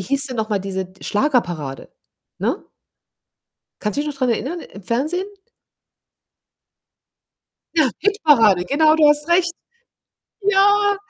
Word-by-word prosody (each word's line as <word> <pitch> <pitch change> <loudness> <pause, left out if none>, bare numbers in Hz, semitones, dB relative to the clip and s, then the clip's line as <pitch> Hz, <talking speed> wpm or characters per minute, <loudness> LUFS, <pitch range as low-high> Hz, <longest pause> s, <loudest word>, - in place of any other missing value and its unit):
hieß 275 +9 -1
denn 255 -2 -6
noch 220 0 -2
mal 210 - 0
diese 190 -1 -4
d 185 +1 -17
Schlagerparade, 175 - -1 0.5
ne? - - -2 1.2
Kannst 210 +3 -3
du - - +2
dich 300 - -3
noch 280 - -10
dran 255 -2 +1
erinnern 285 +10 -3
im 200 - -12
Fernsehen? 300 - -2 2.5
Ja, 305 -6 +3
Hitparade. 290 - +3
Genau, 310 +7 +3
du 310 -2 +5
hast 295 0 +3
recht. 345 0 +2 0.9
Ja. 405 +1 +3
275 Hz, 125 wpm, -20 LUFS, 210-335 Hz, 2.5 s, du